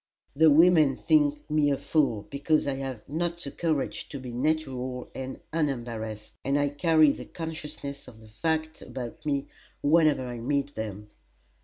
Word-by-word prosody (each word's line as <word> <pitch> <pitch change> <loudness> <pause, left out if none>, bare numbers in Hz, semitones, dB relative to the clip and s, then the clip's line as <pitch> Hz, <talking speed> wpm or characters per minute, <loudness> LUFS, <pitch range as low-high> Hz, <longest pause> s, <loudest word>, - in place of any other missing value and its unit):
The 160 +2 +6
women 155 -2 +6
think 295 -1 +2
me 150 -1 +2
a 140 - +1
fool 135 -11 +1
because 145 +2 +1
I 140 -1 -1
have 130 -5 -6
not 170 +4 -1
the 145 -5 -4
courage 155 -4 -2
to 140 - -6
be 130 -1 -7
natural 130 -2 -2
and 130 0 -6
unembarrassed, 120 -8 -3
and 140 +2 +1
I 145 0 +2
carry 155 0 +4
the - - -7
consciousness 150 -4 -6
of 115 -3 -13
the 110 - -15
fact 160 +7 -2
about 130 +5 -7
me 140 -2 0 0.4
whenever 150 -3 +4
I 120 -1 -5
meet 140 +3 -1
them. 105 -1 -6
140 Hz, 160 wpm, -28 LUFS, 125-155 Hz, 0.4 s, The